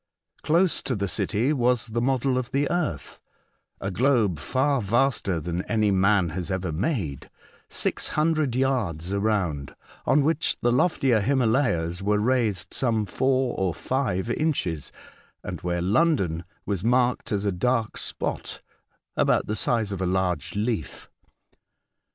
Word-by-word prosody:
Close 170 +3 +2
to 130 - -2
the 100 -1 -1
city 115 +8 0
was 125 -3 +2
the 115 0 -2
model 130 +1 +1
of 125 -1 -2
the 140 +1 +1
earth, 165 - -2 0.6
a 95 - -3
globe 110 - +2
far 135 - +1
vaster 115 -4 +1
than 85 +2 -3
any 110 -3 +1
man 95 -1 +3
has 90 +3 -4
ever 95 -2 -2
made, 85 - -2 0.4
six - - -1
hundred 155 -4 +1
yards 105 - 0
around, 95 -9 -1 0.3
on 145 0 +4
which 160 +2 +1
the 120 - +3
loftier 130 -4 +3
Himalayas 110 - +1
were 105 +1 +2
raised 110 -5 0
some 115 -4 +1
four 130 +4 +1
or 95 -3 0
five 120 -8 -1
inches, 105 - -1 0.5
and - - -6
where 85 0 -1
London 95 - +1 0.2
was 100 -3 -2
marked 125 +1 +1
as 105 -1 0
a 100 - +2
dark 115 +4 0
spot - - -4 0.5
about - - +2
the 105 - -2
size 110 -2 0
of 95 -2 -4
a 95 - 0
large 90 -4 -1
leaf. 105 - -3
110 Hz, 140 wpm, -25 LUFS, 95-130 Hz, 0.6 s, on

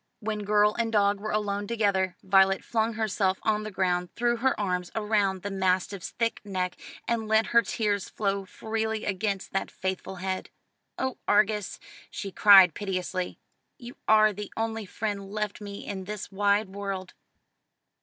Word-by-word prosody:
When 210 -1 -3
girl 210 +1 +4
and 230 -1 -1
dog 205 -2 +3
were 215 +1 -4
alone 205 -1 -1
together, 200 -5 +1
Violet 195 0 +4
flung 225 0 0
herself 200 -3 0
on 215 -1 +1
the 215 - -5
ground, 180 -2 0
threw 240 0 +1
her 260 +1 +1
arms 180 -3 -1
round 210 -4 +1
the 205 - -3
mastiff's 190 0 0
thick 230 -2 -2
neck, 185 -3 -2 0.3
and 230 -2 -1
let 220 0 +4
her 235 - +7
tears 205 -4 -1
flow 200 -2 -1
freely 220 +2 -3
against 195 0 -2
that 195 - -1
faithful 190 0 -4
head. 185 +1 -3 0.5
"Oh, 260 -1 -2
Argus," 210 0 +2 0.3
she 195 - -6
cried 190 -4 +8
piteously, 185 -2 -3 0.4
"you 240 -1 -10
are 215 -1 +6
the 205 +1 -7
only 225 -2 -2
friend 200 -1 -4
left 210 0 -3
me 200 -1 -7
in 190 -2 -5
this 210 +1 -6
wide 205 +1 +2
world!" 195 -2 -5
205 Hz, 155 wpm, -27 LUFS, 190-215 Hz, 0.5 s, cried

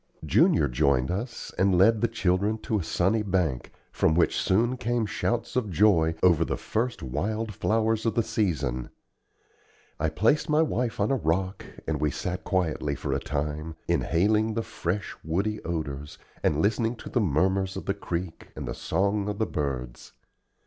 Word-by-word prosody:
Junior - - +4
joined 65 +1 +2
us, 110 +6 -5
and 95 -1 +4
led 105 +4 +5
the 120 - +3
children 100 -1 +1
to 110 -1 -1
a - - -3
sunny 95 +7 +1
bank, 90 -10 -1 0.2
from 80 - +2
which 85 - +3
soon 115 +6 +2
came 120 -2 0
shouts 115 +2 -2
of 120 -5 0
joy 85 -4 +3
over 85 -3 +5
the - - -2
first 120 +2 -2
wildflowers 110 - 0
of 115 - 0
the 115 - +3
season. 75 - -1 1.1
I 80 +1 +1
placed 115 - +2
my 150 +1 +4
wife 125 -7 -1
on 105 +4 +2
a - - +3
rock, 95 -2 -1 0.2
and 75 -2 -1
we 75 - +2
sat 90 +6 -4
quietly 80 -6 0
for - - -3
a - - 0
time, 75 +2 -3
inhaling 105 +6 +2
the 115 - 0
fresh 95 +1 -3
woody 100 +7 -1
odors, 75 -4 -4 0.2
and 75 +1 +1
listening 115 +3 +1
to - - -9
the 120 - +1
murmurs 95 +3 +1
of - - -6
the 100 - +1
creek 85 -3 -5
and - - -5
the - - -3
song 100 +1 0
of 105 - -3
the 110 - +1
birds. 65 - -4
95 Hz, 170 wpm, -27 LUFS, 80-110 Hz, 1.1 s, led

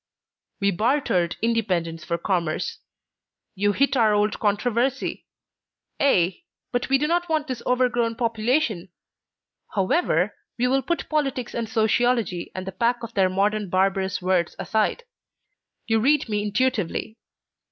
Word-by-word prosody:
"We 200 0 +2
bartered 195 -5 +1
independence 180 -8 0
for 170 +1 -2
commerce. 170 -3 -2 0.7
You 205 +1 +1
hit 275 +6 +2
our 220 -4 +4
old 210 0 +1
controversy. 240 +5 0 0.7
Ay, 190 - +2 0.3
but 245 +1 -1
we 270 - +5
do 290 - 0
not 345 +2 0
want 310 -2 +1
this 255 -5 -5
overgrown 245 -2 +1
population! 230 - 0 0.9
However, 195 - +1 0.2
we 245 - +1
will 270 +2 +2
put 340 +5 -2
politics 275 -5 -1
and 230 -2 -3
sociology 220 -4 +1
and 185 0 -4
the 190 - -4
pack 235 +5 0
of 230 0 -7
their 190 -2 +3
modern 205 +1 0
barbarous 190 0 0
words 180 -2 +1
aside. 220 - 0 0.8
You 225 0 +2
read 285 +6 +3
me 210 -2 -1
intuitively. 215 -1 -1
220 Hz, 130 wpm, -24 LUFS, 190-250 Hz, 0.9 s, we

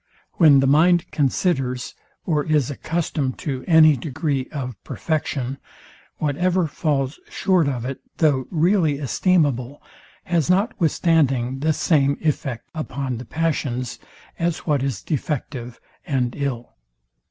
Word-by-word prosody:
When 150 -6 +7
the - - +2
mind 165 +5 +4
considers, 135 -3 0 0.3
or 150 -4 +1
is 150 -4 +1
accustomed 150 -3 -2
to, 130 -3 -3
any 160 -3 +7
degree 135 0 -2
of 130 -4 -4
perfection, 140 -4 -3 0.6
whatever 175 +5 +1
falls 145 -3 -1
short 185 -6 +2
of 125 -3 -3
it, 130 +1 -5 0.2
though 140 -5 +2
really 165 -3 +2
esteemable, 145 -3 +1 0.4
has 170 -2 0
notwithstanding 160 - +2
the 155 +3 +2
same 140 -3 +2
effect 140 -6 -2
upon 135 -5 -4
the 125 - -8
passions; 135 -6 -2 0.4
as 170 -1 -1
what 145 -4 +1
is 130 -7 -3
defective 135 -5 -4 0.2
and 125 -4 -1
ill. 130 -5 -4
145 Hz, 120 wpm, -22 LUFS, 130-160 Hz, 0.6 s, When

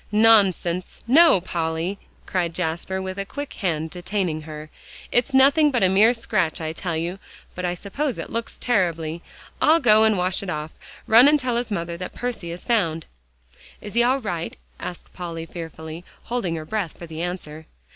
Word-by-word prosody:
"Nonsense. 200 -5 +3
No, 300 - +6
Polly!" 170 +2 -2 0.3
cried 170 -3 -1
Jasper, 180 +2 -2
with 190 +1 -5
a - - 0
quick 285 +7 -6
hand 160 -5 -2
detaining 180 -3 -2
her, 155 0 -9 0.4
"it's 245 +3 +2
nothing 280 +3 +5
but 245 -7 +1
a 185 - +5
mere 205 +5 +6
scratch, 200 -8 0
I 160 -1 -3
tell 170 -1 -3
you, 175 +4 -3 0.3
but 180 - -4
I 175 0 -1
suppose 255 - -3
it - - -6
looks 230 0 -4
terribly. 170 -7 0 0.4
I'll 320 +2 +5
go 215 -6 +5
and 220 -2 +4
wash 180 +3 0
it 200 - -6
off. 150 -1 -4 0.3
Run 235 +5 +8
and 300 0 +5
tell 255 -3 -1
his 240 0 -1
mother 170 -4 -3
that 180 +1 -6
Percy 240 -8 -4
is 170 +1 -7
found." 165 -9 +1 0.7
"Is 205 - -9
he 235 - +4
all 260 +3 +2
right?" 175 -6 -4 0.2
asked 175 - -8
Polly 165 -2 -6
fearfully, 160 0 -8 0.2
holding 230 -8 -2
her 155 -1 -5
breath 195 -2 -3
for 170 - -8
the 160 0 -7
answer. 160 -3 -5
185 Hz, 180 wpm, -23 LUFS, 165-225 Hz, 0.7 s, Run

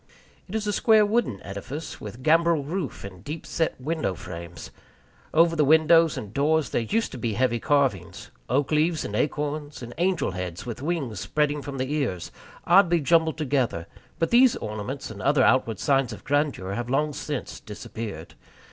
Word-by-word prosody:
It 205 - -6
is 220 -1 -1
a 205 - 0
square 220 0 +5
wooden 210 - 0
edifice, 100 +11 -7
with 115 +5 -8
gambrel 165 0 +3
roof 160 0 -4
and 95 -2 -10
deep 150 +3 -6
set 160 -4 -1
window 150 - -2
frames. 85 0 -9 0.6
Over 165 +1 +4
the 155 - +3
windows 160 0 +5
and 105 -5 -7
doors 155 +3 +1
there - - +1
used 225 - -1
to - - -7
be 115 -3 -1
heavy 120 +1 +1
carvings 115 - 0 0.2
oak 135 +4 +1
leaves 155 +2 +2
and 105 - -4
acorns, 145 +1 -2
and 120 0 -8
angels' 175 - +1
heads 90 0 -5
with 120 0 -6
wings 140 - -2
spreading 150 - 0
from 140 0 -6
the 130 +2 -2
ears, 125 - -2 0.3
oddly 175 -1 +5
jumbled 160 +1 +2
together; 130 - 0 0.3
but 165 - 0
these 245 +1 +6
ornaments 110 +5 -5
and 100 - -9
other 140 0 +3
outward 115 -4 +3
signs 135 -3 +1
of 105 - -9
grandeur 145 -10 0
have 120 +3 -4
long 150 +3 +1
since 145 -2 -5
disappeared. 110 0 -7
145 Hz, 175 wpm, -25 LUFS, 115-160 Hz, 0.6 s, these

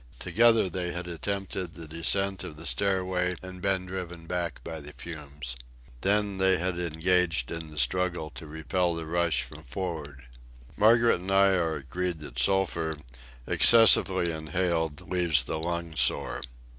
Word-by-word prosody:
Together 115 -3 +4
they 90 0 -3
had 85 +1 -5
attempted 95 0 -4
the 80 -2 -8
descent 95 +5 -1
of 75 - -8
the 80 - -9
stairway 95 -2 0
and 90 -1 -9
been 95 -1 0
driven 90 -2 -7
back 85 -3 -3
by 80 -1 -6
the 75 +1 -10
fumes. 75 -6 -7 0.5
Then 100 0 +1
they 95 -1 +4
had 90 0 -2
engaged 85 -4 +1
in 80 -1 -5
the 75 - -13
struggle 85 +3 0
to 70 +4 -10
repel 85 +3 -1
the 80 -1 -5
rush 85 0 +1
from - - -12
for'ard. 75 -4 -6 0.5
Margaret 115 0 +4
and 90 +2 -6
I 100 0 +5
are 85 -4 +1
agreed 85 +6 -3
that 75 - -7
sulphur, 85 -5 +1 0.5
excessively 95 -6 +6
inhaled, 80 -1 -2
leaves 85 -7 +2
the 80 - -4
lungs 85 -1 -2
sore. - - +1
85 Hz, 150 wpm, -28 LUFS, 80-95 Hz, 0.5 s, excessively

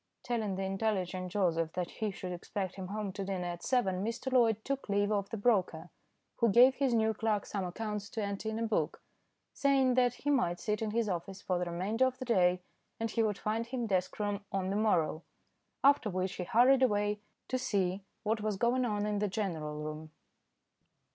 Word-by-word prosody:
Telling 220 -5 -1
the 195 - -2
intelligent 190 -2 -1
Joseph 165 -4 +1
that 180 -1 -3
he 215 -2 -2
should 185 -2 -6
expect 185 +2 -4
him 190 -2 -6
home 205 0 -3
to 195 +1 -5
dinner 190 -2 -3
at 175 -1 -4
seven, 195 -7 +1
Mr. 230 +4 -3
Loyd 225 -4 +4
took 275 -4 -3
leave 205 +1 +2
of 200 -1 0
the 225 - -4
broker, 200 -4 +1 0.5
who 235 - +3
gave 245 +6 +7
his 265 -3 +1
new 220 -1 +3
clerk 215 -2 0
some 200 -2 -3
accounts 205 +2 -4
to 225 -3 -3
enter 200 +2 -3
in 220 - -3
a 230 - -1
book, 205 -9 -1 0.5
saying 270 -2 +3
that 245 -1 +3
he 290 - -1
might 175 -11 +1
sit 210 0 -1
in 220 - -1
his 225 +1 0
office 190 +1 -3
for 180 -1 -1
the 180 - -1
remainder 205 +9 +1
of 255 0 -4
that 255 -1 -6
day 180 -4 +3 0.4
and 225 -1 -2
he 230 - +1
would 210 -3 +1
find 225 +2 -2
him 245 -1 -2
desk 185 -4 0
room 205 -1 -2
on 190 -1 -1
the - - -1
morrow, 175 -7 +2 0.6
after 280 -5 +5
which 185 0 -2
he 180 - -3
hurried 255 +6 +5
away 210 -4 +2 0.3
to 255 - -1
see 195 -4 0 0.2
what 220 0 0
was 210 -2 -1
going 240 +4 +2
on 210 -3 -1
in 210 -1 0
the 210 - +1
general 175 -7 -3
room. 155 +1 -6
205 Hz, 205 wpm, -32 LUFS, 185-230 Hz, 0.6 s, gave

